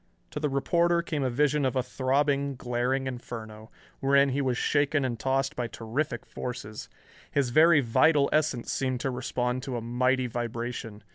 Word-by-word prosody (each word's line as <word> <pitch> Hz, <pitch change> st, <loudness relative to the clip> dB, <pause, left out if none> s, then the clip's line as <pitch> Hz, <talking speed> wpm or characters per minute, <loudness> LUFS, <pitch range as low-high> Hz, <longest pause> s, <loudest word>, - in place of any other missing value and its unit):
To -, -, -4 dB
the 150 Hz, -1 st, 0 dB
reporter 170 Hz, +5 st, +2 dB
came 155 Hz, -4 st, -2 dB
a 130 Hz, -, +1 dB
vision 145 Hz, +3 st, +1 dB
of 130 Hz, 0 st, 0 dB
a 130 Hz, -, +1 dB
throbbing, 140 Hz, +2 st, 0 dB
glaring 125 Hz, +2 st, -1 dB
inferno, 110 Hz, -4 st, -7 dB, 0.3 s
wherein 140 Hz, +1 st, +4 dB
he 135 Hz, +2 st, 0 dB
was 130 Hz, -3 st, 0 dB
shaken 145 Hz, 0 st, +1 dB
and 120 Hz, -3 st, -3 dB
tossed 135 Hz, +2 st, 0 dB
by 120 Hz, -1 st, -2 dB
terrific 120 Hz, +2 st, -3 dB
forces. 120 Hz, -4 st, -6 dB, 0.4 s
His 135 Hz, -4 st, 0 dB
very 155 Hz, +2 st, +6 dB
vital 140 Hz, +4 st, +4 dB
essence 150 Hz, -6 st, 0 dB
seemed 130 Hz, -2 st, -1 dB
to 135 Hz, -, -1 dB
respond 125 Hz, 0 st, -2 dB
to 130 Hz, -2 st, -4 dB
a -, -, -4 dB
mighty 125 Hz, +2 st, +1 dB
vibration. 120 Hz, -2 st, -5 dB
130 Hz, 165 wpm, -28 LUFS, 120-140 Hz, 0.4 s, very